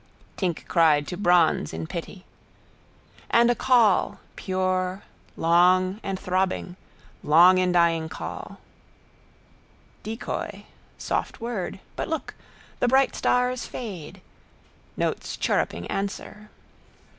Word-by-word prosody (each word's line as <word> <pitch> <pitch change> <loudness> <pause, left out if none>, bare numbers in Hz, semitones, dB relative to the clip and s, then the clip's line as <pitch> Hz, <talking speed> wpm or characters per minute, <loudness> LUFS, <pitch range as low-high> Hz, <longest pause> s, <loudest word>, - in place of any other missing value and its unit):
Tink 180 -4 -3
cried 155 -4 +3
to 180 - -4
bronze 175 - +2
in 80 0 -4
pity. 175 - -7 1.0
And 235 +1 +5
a - - +3
call, 235 -6 +3 0.2
pure, 185 0 -1 0.3
long 185 +3 +3
and 195 -2 -4
throbbing. 185 -1 -1 0.5
Longindying 170 0 +4
call. - - -7 1.4
Decoy. 225 +2 -5 0.3
Soft - - -3
word. 225 -6 -4 0.2
But - - -3
look: 320 - -4 0.5
the - - +2
bright 265 +1 +3
stars 250 0 0
fade. 190 -11 -8 0.8
Notes - - -2
chirruping 85 +1 -1
answer. 210 +1 -5
185 Hz, 95 wpm, -25 LUFS, 170-215 Hz, 1.4 s, And